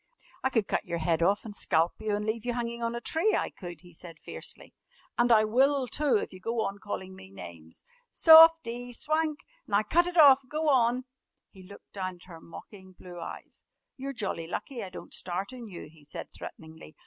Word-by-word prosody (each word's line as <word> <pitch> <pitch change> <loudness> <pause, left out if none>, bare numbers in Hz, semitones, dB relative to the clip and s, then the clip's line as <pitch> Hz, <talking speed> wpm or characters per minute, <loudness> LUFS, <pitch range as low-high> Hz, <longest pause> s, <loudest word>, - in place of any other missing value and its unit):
"I 265 - +2
could 225 -6 0
cut - - -1
your 170 - -4
head 165 0 0
off 200 +6 +2
an' 215 - -7
scalp 165 -3 +1
you 215 -1 -1
an' 210 0 -3
leave 220 +1 -2
you 245 0 -2
hanging 235 0 -4
on 230 0 -2
a - - -3
tree, 330 - +1
I - - -1
could," 175 -4 -10
he 175 -1 -17
said 165 -1 -11
fiercely, - - -8 0.4
"an' 240 0 +2
I 215 -2 +6
will, 265 +4 +2
too, 275 0 +2
if - - -5
you 185 - -11
go 230 +4 -2
on 195 +1 -5
calling 190 -2 -6
me 95 - -13
names." 85 -4 -12 0.3
"Softie! 320 -7 +6
Swank! 310 +2 0 0.3
Now 205 +1 +2
cut 345 +11 +2
it 355 0 -4
off! 280 -4 +8
Go 305 +2 0
on!" 250 -1 +2 0.5
He 190 - -15
looked 200 +2 -15
down 185 -2 -4
at 175 - -19
her 165 -3 -12
mocking 190 +3 -13
blue 175 -1 -11
eyes. - - -9 0.3
"You're 270 +1 -5
jolly 195 -8 -4
lucky 235 +6 -5
I 190 - -6
don't - - -11
start 185 +6 -3
on 245 -3 -9
you," 180 -4 -9
he 155 -1 -19
said 145 - -8
threateningly. 160 -1 -11
215 Hz, 205 wpm, -28 LUFS, 180-255 Hz, 0.5 s, off